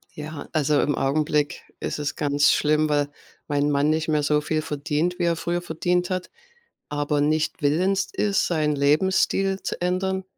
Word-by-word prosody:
Ja. 150 Hz, 0 st, -7 dB
Also, 150 Hz, -2 st, +2 dB
im 145 Hz, -, 0 dB
Augenblick 150 Hz, +1 st, 0 dB, 0.2 s
ist -, -, -3 dB
es 145 Hz, -1 st, -3 dB
ganz 145 Hz, -1 st, +3 dB
schlimm, 155 Hz, +1 st, +2 dB
weil 145 Hz, -1 st, +1 dB, 0.4 s
mein 145 Hz, 0 st, +1 dB
Mann 145 Hz, +1 st, +2 dB
nicht 160 Hz, +1 st, 0 dB
mehr 155 Hz, -2 st, +2 dB
so 150 Hz, +1 st, +2 dB
viel 155 Hz, +1 st, -1 dB
verdient, 155 Hz, +4 st, -2 dB
wie -, -, 0 dB
er 170 Hz, -1 st, +2 dB
früher 175 Hz, +1 st, -2 dB
verdient 175 Hz, +1 st, -1 dB
hat, 185 Hz, 0 st, -3 dB, 0.6 s
aber 145 Hz, 0 st, -1 dB
nicht 155 Hz, +1 st, 0 dB
willens 185 Hz, +7 st, +1 dB
ist, 200 Hz, -2 st, +1 dB
seinen 155 Hz, -3 st, +1 dB
Lebensstil 190 Hz, +6 st, +2 dB
zu -, -, -4 dB
ändern. 190 Hz, +1 st, -1 dB
155 Hz, 170 wpm, -24 LUFS, 145-175 Hz, 0.6 s, ganz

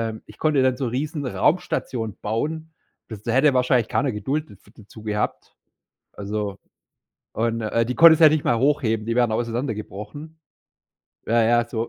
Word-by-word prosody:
äh, -, -, -10 dB
ich -, -, -15 dB
konnte 155 Hz, -3 st, +2 dB
dann 130 Hz, -1 st, +2 dB
so 135 Hz, -, -2 dB
riesen 145 Hz, +5 st, -3 dB
Raumstationen 125 Hz, -, -1 dB
bauen. 155 Hz, +9 st, -3 dB, 0.3 s
Bis 110 Hz, -2 st, -9 dB
da 115 Hz, -, -2 dB
hätte 135 Hz, +3 st, +3 dB
wahrscheinlich 125 Hz, -2 st, +2 dB
keiner 135 Hz, +2 st, 0 dB
Geduld 135 Hz, +9 st, -3 dB
daf 100 Hz, -, -16 dB, 0.2 s
dazu 110 Hz, +1 st, -14 dB
gehabt. 105 Hz, -1 st, -3 dB, 0.6 s
Also 105 Hz, -1 st, -4 dB, 0.7 s
und, 115 Hz, +1 st, -1 dB
äh, 115 Hz, +1 st, 0 dB
die 125 Hz, -, -3 dB
konntest 165 Hz, +1 st, +7 dB
ja 160 Hz, -, +9 dB
nicht 155 Hz, -1 st, +1 dB
mal 115 Hz, -, +2 dB
hochheben, 120 Hz, -5 st, +1 dB
die 115 Hz, -, -1 dB
wären 120 Hz, -1 st, +2 dB
auseinander 115 Hz, +3 st, -2 dB
gebrochen. 110 Hz, -, -9 dB, 0.9 s
Ja, 115 Hz, 0 st, +3 dB
ja, 120 Hz, +1 st, +3 dB
so 115 Hz, -1 st, -3 dB
120 Hz, 165 wpm, -23 LUFS, 110-145 Hz, 0.9 s, ja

